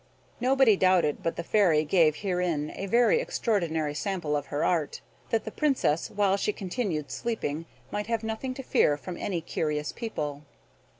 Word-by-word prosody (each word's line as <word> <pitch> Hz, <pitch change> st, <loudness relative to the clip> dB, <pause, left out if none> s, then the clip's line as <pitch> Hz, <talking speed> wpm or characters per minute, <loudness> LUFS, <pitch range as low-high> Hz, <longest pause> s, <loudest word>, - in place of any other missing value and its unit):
Nobody; 260 Hz, -3 st, +4 dB
doubted 185 Hz, -5 st, +3 dB
but 165 Hz, -, -1 dB
the 170 Hz, -, -4 dB
Fairy 170 Hz, -6 st, +3 dB
gave 155 Hz, -2 st, +4 dB
herein 180 Hz, -6 st, -1 dB
a 195 Hz, -, -4 dB
very 240 Hz, -, +4 dB
extraordinary 165 Hz, -, -1 dB
sample 165 Hz, -2 st, -2 dB
of 145 Hz, -1 st, -2 dB
her 145 Hz, -, -1 dB
art, 165 Hz, -5 st, 0 dB, 0.3 s
that 225 Hz, -, +1 dB
the 220 Hz, -, -6 dB
Princess, 265 Hz, -, +1 dB
while 200 Hz, -1 st, +2 dB
she 210 Hz, -, 0 dB
continued 185 Hz, -, -3 dB
sleeping, 165 Hz, -, -3 dB, 0.2 s
might 210 Hz, 0 st, -3 dB
have 230 Hz, -1 st, -1 dB
nothing 225 Hz, +4 st, -3 dB
to 270 Hz, -, -6 dB
fear 145 Hz, -, +3 dB
from 175 Hz, +4 st, -7 dB
any 175 Hz, -1 st, -2 dB
curious 150 Hz, -2 st, -2 dB
people. 150 Hz, -, -4 dB
185 Hz, 165 wpm, -28 LUFS, 155-220 Hz, 0.3 s, Nobody